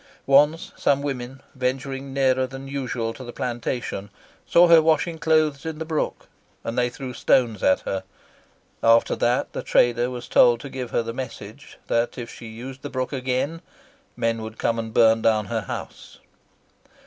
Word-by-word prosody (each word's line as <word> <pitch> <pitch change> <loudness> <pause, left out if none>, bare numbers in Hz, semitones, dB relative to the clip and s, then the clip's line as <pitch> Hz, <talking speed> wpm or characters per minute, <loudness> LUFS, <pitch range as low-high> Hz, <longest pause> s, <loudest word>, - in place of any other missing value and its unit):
Once 145 +4 +4
some 140 0 +1
women, 130 -2 -5
venturing 135 +1 -3
nearer 130 -1 +2
than 135 +1 -9
usual 125 -4 -3
to 130 - -10
the 120 - -7
plantation, 120 -4 -4 0.4
saw 175 +1 +6
her 165 -1 +8
washing 160 +1 +1
clothes 155 -3 +2
in 160 -1 -5
the 160 - -4
brook, 155 -1 -2 0.4
and 115 - -4
they 125 0 +2
threw 130 -1 -7
stones 115 -4 +2
at 95 - +3
her. 95 -1 -3 0.8
After 115 0 +4
that 120 +1 +1
the - - -3
trader 120 0 +2
was 125 -1 -7
told 120 -1 +5
to 140 - -7
give 130 -2 -5
her 115 - 0
the 115 0 -5
message 130 0 -8
that 115 0 0
if 120 -2 -7
she 115 - -10
used 125 +4 -9
the 145 - -6
brook 130 +1 -3
again 130 +5 -2 0.6
men 115 -1 0
would 110 0 -8
come 115 0 0
and 115 -1 -4
burn 110 0 +4
down 110 -2 +2
her 115 0 -2
house." 95 - -8
125 Hz, 170 wpm, -24 LUFS, 115-140 Hz, 0.8 s, her